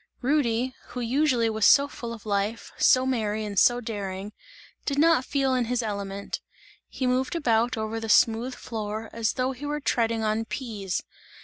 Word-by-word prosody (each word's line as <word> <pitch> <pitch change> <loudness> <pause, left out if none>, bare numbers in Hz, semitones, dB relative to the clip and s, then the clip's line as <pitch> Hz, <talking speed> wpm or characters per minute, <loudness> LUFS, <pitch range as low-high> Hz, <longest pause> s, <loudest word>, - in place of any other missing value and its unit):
Rudy, 255 -3 +1
who 250 - -6
usually 245 0 +2
was 220 -1 -2
so 280 +5 +7
full 235 -4 -7
of 230 -2 -9
life, 205 +2 -2
so 255 0 +4
merry 220 -4 -1
and 200 -2 0
so 245 0 +5
daring, 205 -3 -5 0.5
did 280 - -2
not 320 -3 +4
feel 270 -1 +1
in 250 -2 +1
his 245 +1 -1
element; 200 -2 -4 0.5
he 260 - -3
moved 255 +5 0
about 240 -5 +1
over 220 +1 -3
the 225 0 -5
smooth 230 +4 +3
floor 220 -1 -5
as 225 -1 0
though 255 +1 0
he 270 +3 -7
were 295 +1 -2
treading 230 -5 0
on 215 +1 0
peas. 215 -7 -4
230 Hz, 175 wpm, -26 LUFS, 215-255 Hz, 0.5 s, so